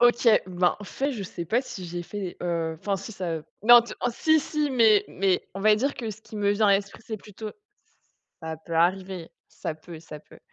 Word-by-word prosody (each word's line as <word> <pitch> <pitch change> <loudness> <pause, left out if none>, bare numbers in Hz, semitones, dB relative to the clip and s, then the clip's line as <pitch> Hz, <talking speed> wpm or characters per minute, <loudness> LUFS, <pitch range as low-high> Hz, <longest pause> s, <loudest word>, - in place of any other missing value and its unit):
OK, 240 0 +5 0.2
ben 180 -1 +1
au - - -7
fait 275 +7 -2
je 215 -5 -5
sais 175 -2 -6
pas 235 +9 +1
si 190 -7 -8
j'ai 175 +1 -4
fait, 190 0 -6
heu, 165 -2 -1
enfin 200 -1 -1
si 220 - -8
ça 170 -5 -3 0.2
non, 240 +2 +9
t 235 - -8 0.2
si 315 +5 +3
si, 300 0 -1
mais 225 -5 +5
mais 190 -1 0
on 195 - -5
va 210 +1 +5
dire 275 +5 0
que 225 -3 -4
ce 215 +1 -10
qui 220 - -11
me 205 -1 +2
vient 205 +1 +3
à 200 - +6
l'esprit, 200 0 -3
c'est 220 - -4
plutôt, 210 +1 -9
ce - - -11 0.9
ça 160 0 -5
peut 170 - -5
arriver, 185 +1 +1 0.2
ça 155 - -5
peut, 160 +1 -11
ça 150 -2 -10
peut, - - -18
200 Hz, 230 wpm, -26 LUFS, 175-225 Hz, 0.9 s, non